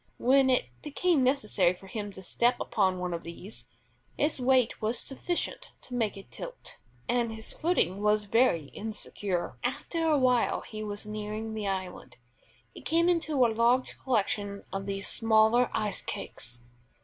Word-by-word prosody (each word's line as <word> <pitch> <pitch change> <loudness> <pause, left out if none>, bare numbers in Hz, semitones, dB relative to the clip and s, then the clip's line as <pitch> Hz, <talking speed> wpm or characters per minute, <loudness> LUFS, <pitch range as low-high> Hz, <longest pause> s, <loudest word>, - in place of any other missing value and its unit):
When 265 +2 +4
it 255 - +3 0.2
became 310 +1 +1
necessary 215 -9 +2
for 195 - -15
him 205 +1 -5
to 190 - -10
step 235 +7 +1
upon 185 -1 +1
one 180 -1 -2
of 170 - -3
these, 175 +5 -10 0.5
his 295 -1 0
weight 255 -1 +3
was 220 +3 0
sufficient 350 - -3
to 250 - -11
make 225 -4 0
it 195 - -12
tilt, - - -9 0.3
and 240 -2 +1
his 220 0 -8
footing 310 - +1
was 210 0 +3
very 205 - +3
insecure. 205 -4 -4
After 285 +6 -2
awhile 255 -6 +3
as - - -14
he 215 -1 -5
was 205 0 -5
nearing 215 +1 -4
the 215 -2 -3
island, 185 -9 -4 0.6
he - - -10
came 335 +2 +2
into 315 -7 +3
a 225 - +1
large 240 +3 +2
collection 205 -4 -1
of 195 0 -3
these 195 0 -3
smaller 225 +2 +4
ice 210 -3 -1
cakes. 120 0 -6
220 Hz, 160 wpm, -29 LUFS, 200-255 Hz, 0.6 s, When